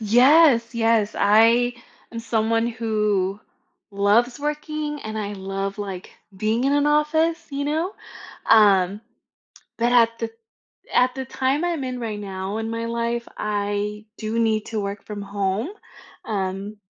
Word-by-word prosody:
Yes, 245 +1 +5
yes, 225 -2 +2
I 230 +4 +4 0.4
am 230 - -5
someone 225 0 0
who 210 -4 -1 0.5
loves 210 +5 +2
working, 300 0 -3
and 220 -2 -5
I 205 -1 -3
love, 195 +1 -4
like, 195 -3 -6 0.3
being 220 +4 0
in 275 - +2
an 290 0 +2
office, 315 +3 +1
you 280 0 -3
know? 320 +7 -1 0.6
Um, 200 -2 +5 0.8
but 240 +1 +1
at 230 -1 +4
the 230 -1 -3 0.6
at 250 0 +3
the 265 0 -4
time 265 +5 -1
I'm 340 -5 -1
in 255 -1 -4
right 220 -3 -4
now 195 +1 -4
in 225 0 -3
my 230 0 -3
life, 235 0 -2
I 205 0 -2
do 220 +1 -3
need 220 -2 +1
to 220 -2 -3
work 200 0 -5
from 205 -1 -6
home, 200 - -2 0.6
um 200 0 -3
225 Hz, 140 wpm, -23 LUFS, 205-250 Hz, 0.8 s, Yes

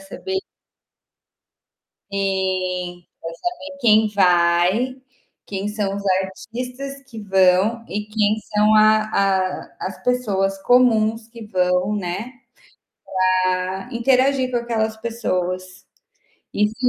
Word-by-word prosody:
saber 380 - -4 1.7
Sim, 185 -2 -2
pra - - -52 0.4
saber 280 0 -10
quem 220 -3 +5
vai, 180 +5 +3 0.5
quem 200 0 -4
são 210 -2 -2
os 200 - -5 0.2
artistas 250 +8 -7
que 225 -3 -8
vão 195 +4 +3
e 210 +1 -4
quem 215 0 +1 0.2
são 210 +1 +4
a 215 0 +6
a 190 -2 0
as 190 - -10
pessoas 200 -6 0
comuns 225 -3 +3
que 230 -2 -11
vão, 180 +1 +1
né, 200 +5 -4 1.0
pra 185 0 0
interagir 255 +2 +2
com 245 - +1
aquelas 225 -2 -1
pessoas. 185 -5 -3 0.7
E 210 - +2
se 215 - -10
210 Hz, 105 wpm, -21 LUFS, 185-230 Hz, 1.7 s, a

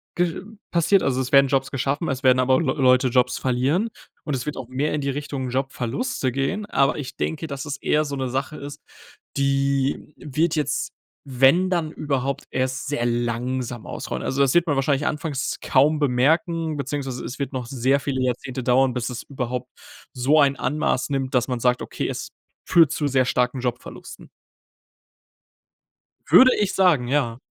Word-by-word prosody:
ge 175 0 0 0.3
passiert. 180 +3 +3
Also, 130 -1 0
es 130 0 -4
werden 140 0 +6
Jobs 135 0 0
geschaffen, 140 +5 -1
es 130 -1 -2
werden 130 -2 +4
aber 130 +1 +3
Leu 165 - 0
Leute 130 -2 +4
Jobs 125 0 +2
verlieren 135 - 0 0.3
und 145 - -2
es 125 - -4
wird 150 - -4
auch 130 -3 -6
mehr 135 +5 -1
in 150 - -1
die 140 - -2
Richtung 140 -2 -4
Jobverluste 130 - -2
gehen. 135 - -2
Aber 135 -9 +2
ich 140 -4 -6
denke, 160 0 -3
dass 140 0 -6
es 145 -2 -4
eher 150 +2 +1
so 145 -1 -4
'ne 130 -2 -2
Sache 135 +4 -3
ist, 145 0 -9 0.5
die 140 +1 0
wird 155 +3 -1
jetzt, 145 -1 -1 0.4
wenn 135 +9 +4
dann 170 -4 -1
überhaupt, 140 -2 -2
erst 130 +2 -2
sehr 140 -5 -1
langsam 120 0 -2
ausrollen. 65 - -5
Also, 135 - -2
das 135 -2 +3
wird 175 0 +4
man 150 -4 0
wahrscheinlich 140 +1 +1
anfangs 150 -2 -2
kaum 150 +3 +3
bemerken, 155 +4 +1
beziehungsweise 135 -2 -4
es 125 - -6
wird 140 - -3
noch 130 -2 -3
sehr 135 +2 +1
viele 135 -2 -2
Jahrzehnte 130 +1 -3
dauern, 130 +1 +3
bis 120 0 -2
es 125 -1 -6
überhaupt 125 -2 -4 0.5
so 135 +4 +3
ein 140 -1 +4
Ausmaß 145 +1 -1
nimmt, 135 -2 -2
dass 120 -1 +2
man 125 -1 -2
sagt: 125 0 +1
„Okay, - - -4
es - - -5 0.4
führt 165 -4 +5
zu 145 - -1
sehr 130 -2 +2
starken 125 +1 0
Jobverlusten.“ 125 -1 -6 2.0
Würde 255 0 +8
ich 205 -2 0
sagen, 170 -10 +3
ja. 125 -4 0
135 Hz, 175 wpm, -23 LUFS, 130-150 Hz, 2.0 s, Würde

